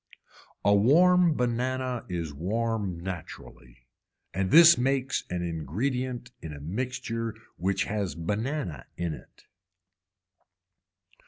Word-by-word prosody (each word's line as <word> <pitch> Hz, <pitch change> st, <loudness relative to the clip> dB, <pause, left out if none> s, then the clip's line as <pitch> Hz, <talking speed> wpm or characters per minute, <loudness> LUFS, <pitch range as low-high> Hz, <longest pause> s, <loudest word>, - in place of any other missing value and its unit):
A 100 Hz, -, +6 dB
warm 170 Hz, -, +5 dB
banana 125 Hz, 0 st, -1 dB
is 85 Hz, -4 st, -3 dB
warm 100 Hz, +2 st, -2 dB
naturally 65 Hz, -8 st, -9 dB, 0.5 s
and 95 Hz, 0 st, -1 dB
this 170 Hz, -, +9 dB
makes 135 Hz, +1 st, 0 dB
an 90 Hz, 0 st, -2 dB
ingredient 120 Hz, -, -3 dB
in 80 Hz, -2 st, -7 dB
a 75 Hz, -, -8 dB
mixture 115 Hz, -, -3 dB, 0.2 s
which 95 Hz, +2 st, 0 dB
has 100 Hz, -3 st, -2 dB
banana 100 Hz, -, -3 dB
in 85 Hz, -2 st, -2 dB
it. -, -, -14 dB
105 Hz, 100 wpm, -28 LUFS, 85-130 Hz, 0.5 s, this